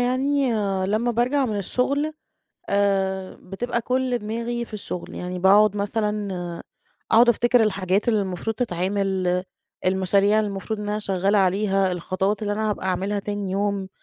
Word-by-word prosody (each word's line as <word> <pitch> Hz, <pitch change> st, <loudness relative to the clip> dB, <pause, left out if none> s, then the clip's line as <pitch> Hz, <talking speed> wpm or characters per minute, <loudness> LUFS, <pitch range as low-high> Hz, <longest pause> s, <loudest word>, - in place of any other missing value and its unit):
يعني 265 Hz, +2 st, +1 dB, 0.4 s
لمّا 220 Hz, +5 st, +1 dB
بارجَع 250 Hz, +4 st, +1 dB
من 215 Hz, -2 st, -2 dB
الشُّغل 280 Hz, -, 0 dB, 0.6 s
آآ 195 Hz, -1 st, 0 dB
بتبقى 235 Hz, +6 st, -3 dB
كلّ 250 Hz, 0 st, 0 dB
دماغي 235 Hz, +2 st, -3 dB
في 220 Hz, -, -11 dB
الشُّغل، 180 Hz, -4 st, -6 dB
يعني 180 Hz, 0 st, -5 dB
باقعُد 205 Hz, +3 st, +5 dB
مثلًا 210 Hz, 0 st, -1 dB, 0.8 s
أقعُد 235 Hz, +2 st, +6 dB
أفتكِر 240 Hz, +1 st, +4 dB
الحاجات 195 Hz, 0 st, 0 dB
اللي 220 Hz, -3 st, +3 dB
المفروض 190 Hz, +4 st, -3 dB
تتعِمل، 185 Hz, -3 st, 0 dB, 0.4 s
المشاريع 195 Hz, +3 st, +3 dB
اللي 215 Hz, -1 st, +1 dB
المفروض 205 Hz, +2 st, -4 dB
إن 205 Hz, -, -4 dB
أنا 210 Hz, 0 st, -1 dB
شغَّالة 195 Hz, 0 st, +1 dB
عليها، 195 Hz, 0 st, +2 dB
الخطوات 190 Hz, +4 st, -1 dB
اللي 205 Hz, -1 st, -1 dB
أنا 215 Hz, +1 st, 0 dB
هابقى 200 Hz, -, -3 dB
أعملها 190 Hz, +2 st, -1 dB
تاني 205 Hz, -1 st, -4 dB
يوم. 200 Hz, 0 st, -1 dB
205 Hz, 145 wpm, -23 LUFS, 190-230 Hz, 0.8 s, أقعُد